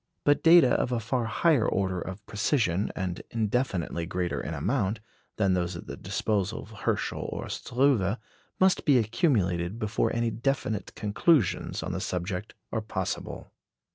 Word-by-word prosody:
But 145 0 +3
data 165 -5 +7
of 125 - +1
a 120 - +1
far 115 +2 -1
higher 135 +2 +3
order 95 -2 0
of 95 +4 -7
precision, 105 - 0
and 90 -2 -3
indefinitely 105 -7 -1
greater 90 0 -2
in 80 +4 -4
amount, 105 - 0 0.4
than 100 -3 +3
those 90 -1 -1
at 85 - -8
the - - -6
disposal 105 0 -1
of 110 - -14
Herschel 110 - -2
or - - -4
Struve 120 -5 +1 0.4
must 190 0 +4
be 140 -4 +5
accumulated 105 - +1
before 110 -1 0
any 115 0 0
definite 115 -4 -2
conclusions 110 - +1
on - - -3
the - - -3
subject 90 +3 -3 0.2
are 110 - -1
possible. 95 -4 -4
105 Hz, 150 wpm, -28 LUFS, 95-125 Hz, 0.4 s, data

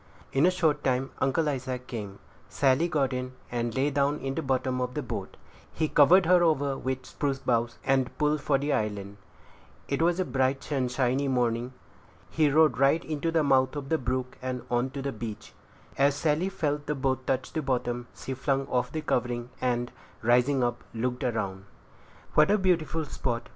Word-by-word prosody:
In 140 +6 +4
a - - +6
short 170 -5 +1
time 130 0 0
Uncle 150 +4 +1
Isaac 130 -3 -3
came. 105 -6 -6 0.3
Sally 140 +4 +2
got 140 -6 0
in, 125 0 -4 0.2
and 120 -1 -2
lay 140 +2 +1
down 140 +1 +1
in 135 -1 -3
the 165 - -2
bottom 130 -2 0
of 125 0 -3
the 150 - -2
boat; 120 - -6 0.3
he 155 - -1
covered 165 +6 +6
her 180 +1 +5
over 145 -5 +2
with 130 -1 -3
spruce 140 -2 -2
boughs, 120 -3 0
and 135 -1 +1
pulled 150 0 +1
for 140 -1 +2
the 145 +1 -1
island. 105 -3 -2 0.7
It 140 +2 -1
was 175 +2 +2
a 185 - +1
bright, 135 +1 0
sunshiny 130 0 0
morning. 125 -1 0 0.6
He 155 -2 +3
rowed 155 -1 +4
right 140 +5 +3
into 155 +1 -2
the 165 -1 +2
mouth 135 -1 +3
of 140 -2 -5
the 160 - +2
brook, 125 +1 -3
and 125 -1 -4
on 120 +2 +1
to 135 0 -6
the 140 - -2
beach. 110 -3 -7 0.5
As 140 +1 +4
Sally 155 +5 +1
felt 145 -5 -2
the 150 - 0
boat 130 -1 -1
touch 130 -1 -1
the 160 - -1
bottom, 120 -3 -2
she 135 - -5
flung 135 +1 0
off 125 0 0
the 155 - -3
covering, 120 -4 -1
and, 120 -1 0 0.3
rising 125 +3 +3
up, 120 0 -1
looked 125 +2 -2
around 110 -6 -1
her. 95 - -17 0.7
"What 155 +3 +5
a 210 - +4
beautiful 165 -4 +1
spot!" 120 -4 -3
135 Hz, 190 wpm, -28 LUFS, 125-150 Hz, 0.7 s, a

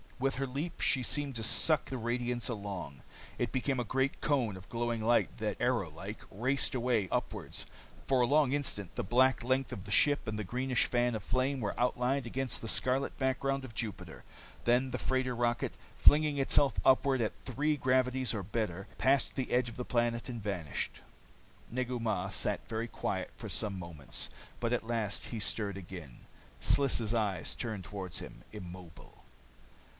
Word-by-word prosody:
With 135 +1 0
her 135 +1 -1
leap, 145 +7 -4
she 130 - +4
seemed 140 +1 +1
to 115 - -2
suck 120 +8 +3
the 130 - -3
radiance 120 +1 -1
along. 100 - -5 0.4
It 120 -3 -1
became 130 0 0
a - - +1
great 130 +4 0
cone 125 -9 +1
of 95 +1 -13
glowing 120 -1 -1
light 120 +2 +3
that, 105 -2 -2
arrow 120 -8 +1
like, 95 +8 -8
raced 130 +7 +1
away 120 -5 +1
upward. - - -2 0.5
For 130 -2 +4
a 120 - +4
long 145 -1 +4
instant 130 -10 -1
the - - -1
black 130 +5 +3
length 130 +2 +1
of 95 - -5
the 100 - -8
ship, 145 +4 +4
and 110 -1 -2
the - - -1
greenish 125 +5 0
fan 120 0 +1
of 105 - -4
flame, 130 +4 0
were 105 -4 -3
outlined 125 +2 +1
against 130 +2 -2
the 115 - -5
scarlet 130 +4 +1
background 135 +1 0
of 115 -4 -11
Jupiter. 95 -8 -4 0.4
Then 125 +2 +3
the - - -1
freighter 130 -1 0
rocket, 120 0 0 0.2
flinging 150 -1 +6
herself 140 0 +4
upward 130 -1 +4
at 110 - -2
three 150 +4 0
gravities 130 -1 +2
or 105 -3 -2
better, 100 -1 -3
passed 135 +1 +3
the 130 - -2
edge 125 0 +2
of 115 - -11
the 125 - -3
planet 120 0 0
and 120 -3 -5
vanished. 90 -8 -3 0.7
Negu 125 0 -2
Mah 110 -2 -1
sat - - -1
very 115 +1 -2
quiet - - -3
for - - -7
some 100 -3 0
moments. 85 -6 -5 0.3
But 120 0 0
at 120 - 0
last 115 -3 -1
he 115 - -5
stirred 105 -2 -1
again. 85 -8 -9 0.4
Sliss' 120 -5 +4
eyes 100 -7 0
turned 110 -6 -4
toward 95 -3 -5
him, - - -6
immobile. 90 -4 -10
120 Hz, 175 wpm, -32 LUFS, 105-130 Hz, 0.7 s, flinging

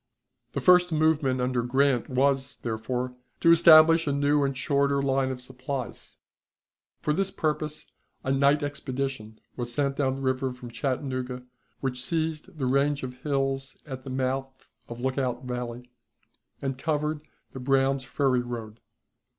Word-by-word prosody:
The - - -2
first 180 -1 +5
movement 155 -4 +2
under 125 -1 0
Grant 130 +1 +1
was, 135 +1 +1
therefore, 125 +2 -2 0.3
to 170 - +5
establish 165 -1 +7
a - - +2
new 145 +1 +2
and 135 -1 -1
shorter 140 0 +1
line 135 -1 +1
of 130 -1 -4
supplies. 130 0 -6 0.9
For 150 - +1
this 195 +4 0
purpose 155 -2 -2 0.4
a 130 - -1
night 140 +2 +3
expedition 135 -5 -4 0.2
was 120 -1 -3
sent 140 +2 0
down 135 -2 +1
the 135 - -7
river 130 0 0
from 125 -1 -10
Chattanooga, 130 -1 -3 0.4
which 125 -2 -2
seized 160 0 -2
the 135 - -1
range 140 +2 +1
of 125 -1 -6
hills 135 -1 -1
at 130 -3 -7
the 135 - -8
mouth 130 +1 -3 0.2
of 120 0 -7
Lookout 130 -1 -1
Valley, 125 0 -5 0.7
and 135 -1 -2
covered 150 0 -1 0.3
the 130 - -8
Brown's 135 +1 +2
Ferry 130 -1 +1
road. 115 -3 -7
135 Hz, 145 wpm, -27 LUFS, 125-145 Hz, 0.9 s, establish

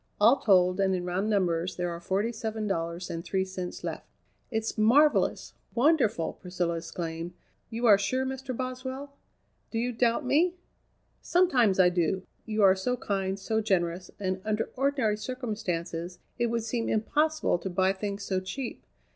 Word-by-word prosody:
"All 230 +6 +6
told, 185 -5 +4
and 190 -1 +3
in 180 -1 -3
round 185 +4 -1
numbers, 180 -3 +1
there 175 -1 -2
are 170 - -5
forty 195 +6 0
seven 220 -1 -4
dollars 170 -2 -2
and 165 0 -4
three 190 +1 0
cents 185 -1 -6
left." - - -5 0.4
"It's 220 -1 -2
marvellous! 270 +8 +3 0.2
wonderful!" 245 - +2
Priscilla 180 -2 -2
exclaimed. 165 0 -5 0.4
"You 230 +2 -2
are 205 -3 +7
sure, 255 +7 0
Mr. 265 -1 -4
Boswell?" 260 +2 -5 0.5
"Do 225 - -4
you 245 +2 0
doubt 235 +3 +1
me?" 325 +7 +3 0.7
"Sometimes 255 - +3
I 180 -1 +7
do, 180 +1 0 0.2
you 215 -1 +1
are 190 -1 +7
so 250 +7 -1
kind, 195 -5 -2
so 220 +3 -1
generous, 180 -3 0
and 185 -1 -2
under 215 0 -1
ordinary 265 -6 +1
circumstances 185 -8 -4 0.2
it 240 - +2
would 230 0 -1
seem 230 +1 -2
impossible 300 - +1
to 190 - -4
buy 185 +1 +2
things 200 +1 -4
so 190 -1 0
cheap. 235 +7 -5
205 Hz, 160 wpm, -28 LUFS, 180-245 Hz, 0.7 s, are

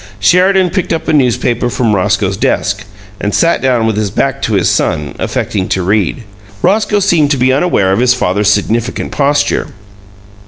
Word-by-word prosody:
Sheridan 180 - +3
picked 185 -4 -2
up 165 - -4
a - - +1
newspaper 125 -3 +1
from 120 -3 0
Roscoe's 100 0 0
desk, - - -1 0.3
and 105 0 -2
sat 170 0 +2
down 125 -4 +1
with 110 -2 -1
his 105 -2 -1
back 135 +6 -2
to 115 - -1
his 95 -4 +2
son, 75 -1 -1
affecting 95 -3 -2
to 95 - -1
read. 105 +4 0 0.4
Roscoe 210 0 +2
seemed 170 -7 +2
to 140 - +1
be 130 +1 +2
unaware 135 - +1
of 95 - +1
his 125 0 +3
father's 100 -2 0
significant 110 +3 -1
posture. 145 0 0
120 Hz, 170 wpm, -12 LUFS, 100-145 Hz, 0.4 s, Sheridan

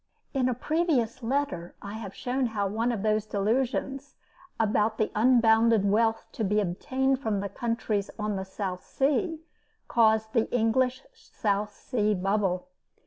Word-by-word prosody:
In 260 -2 +2
a 250 - -1
previous 265 -5 0
letter, 230 -9 -2
I 200 0 -8
have 215 -3 -7
shown 255 0 -1
how 210 -3 -1
one 225 +5 0
of 215 -4 -3
those 215 0 +1
delusions, 260 +6 -1 0.4
about 220 0 +2
the 215 - 0
unbounded 225 -2 +4
wealth 225 +2 +2
to 225 - -3
be 210 +1 +2
obtained 260 +8 0
from 220 -7 -1
the 200 0 -3
countries 215 -2 -2
on 210 -1 -2
the 190 - -3
South 190 -1 -5
Sea, 310 +4 0 0.5
caused 220 -1 +3
the 230 -3 +1
English 245 +2 +1
South 210 - -2
Sea 210 -3 0
bubble. 195 +1 0
220 Hz, 145 wpm, -27 LUFS, 205-255 Hz, 0.5 s, unbounded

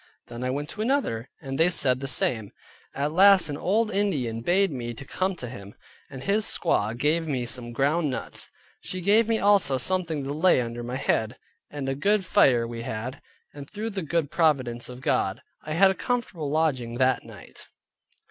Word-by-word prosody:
Then 120 +1 -6
I 130 - -1
went 145 +3 -3
to 215 - -6
another, 220 - -1
and 135 0 -5
they 165 +2 +5
said 130 -7 +1
the 135 - -5
same; 110 -5 0 0.5
at 145 +2 -1
last 190 -1 +6
an 145 - -3
old 215 +7 +1
Indian 145 - -1
bade 190 +6 +2
me 120 -3 -5
to 135 - -10
come 185 +6 -1
to 125 - -7
him, 100 -4 -10 0.3
and 135 -2 -9
his 210 +5 +1
squaw 110 - +1
gave 160 +5 +1
me 130 -5 -1
some 120 0 -6
ground 145 +6 +1
nuts; 130 - -3 0.3
she 185 - -5
gave 210 +5 +3
me 225 -1 +2
also 200 -10 +3
something 165 +1 0
to 140 +1 -3
lay 165 0 +4
under 120 -1 -4
my 120 +2 -5
head, 110 -1 0 0.3
and 145 -2 -5
a 135 - 0
good 200 +8 +1
fire 120 -8 +4
we 115 0 -6
had; 115 +4 -5 0.3
and 140 -1 -10
through 220 +2 -5
the 195 -2 -3
good 160 -2 -1
providence 130 -8 +1
of 125 0 -9
God, 100 -4 0 0.2
I 155 - -5
had 190 +4 +5
a - - -1
comfortable 190 - -3
lodging 140 -7 0
that 130 +1 +2
night. - - -13
145 Hz, 195 wpm, -26 LUFS, 125-185 Hz, 0.5 s, last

